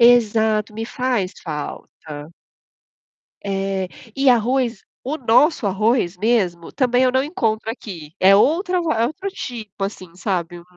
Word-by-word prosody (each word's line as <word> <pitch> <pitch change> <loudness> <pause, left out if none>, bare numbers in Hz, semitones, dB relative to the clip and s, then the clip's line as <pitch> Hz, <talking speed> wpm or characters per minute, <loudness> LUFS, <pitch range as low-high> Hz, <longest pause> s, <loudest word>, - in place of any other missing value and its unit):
Exato, 220 -2 +4
me 225 +1 -3
faz 240 -6 -1
falta. 150 -1 -7 1.1
É, 195 -1 -1 0.3
e 275 0 +4
arroz, 240 -1 +2 0.2
o 290 +5 -2
nosso 250 0 +3
arroz 200 -2 +1
mesmo, 185 -6 0
também 250 -1 +2
eu 255 - +3
não 260 +1 +2
encontro 225 -8 -1
aqui. 175 - -7
É 195 +1 +7
outra 360 - +3
va 325 -5 0
é 230 - +3
outro 375 +8 -5
tipo, 225 - -6
assim, 185 -3 -6
sabe, 175 -2 -2
hum. - - -15
220 Hz, 140 wpm, -21 LUFS, 190-255 Hz, 1.1 s, É